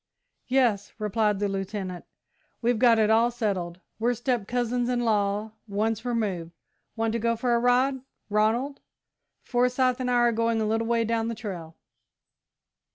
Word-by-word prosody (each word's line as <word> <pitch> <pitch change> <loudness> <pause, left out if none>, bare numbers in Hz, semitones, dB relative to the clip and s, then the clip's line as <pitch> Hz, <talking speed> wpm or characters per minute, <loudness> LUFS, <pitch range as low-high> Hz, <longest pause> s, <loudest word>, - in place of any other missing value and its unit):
"Yes," 245 -6 +1
replied 210 -1 +1
the 205 +1 0
Lieutenant, 195 -2 -4 0.5
"we've 240 -1 +1
got 235 -2 +5
it 215 0 +3
all 230 +2 +4
settled. 190 -7 -3 0.2
We're 240 +2 +1
step 240 -3 -1
cousins 245 0 0
in 245 -1 0
law 210 -1 0 0.2
once 215 +2 -1
removed. 200 -9 -2 0.4
Want 225 -1 0
to 235 - 0
go 230 +1 +1
for 240 +1 0
a 235 - +3
ride, 255 +2 +2 0.3
Ronald? 225 +7 +1 0.6
Forsyth 250 +1 +1
and 255 -1 -1
I 245 - +2
are 240 0 +4
going 230 0 +1
a 220 - 0
little 225 +1 0
way 230 -1 +2
down 225 0 0
the 230 - -3
trail." 175 -8 -7
225 Hz, 160 wpm, -26 LUFS, 210-245 Hz, 0.6 s, got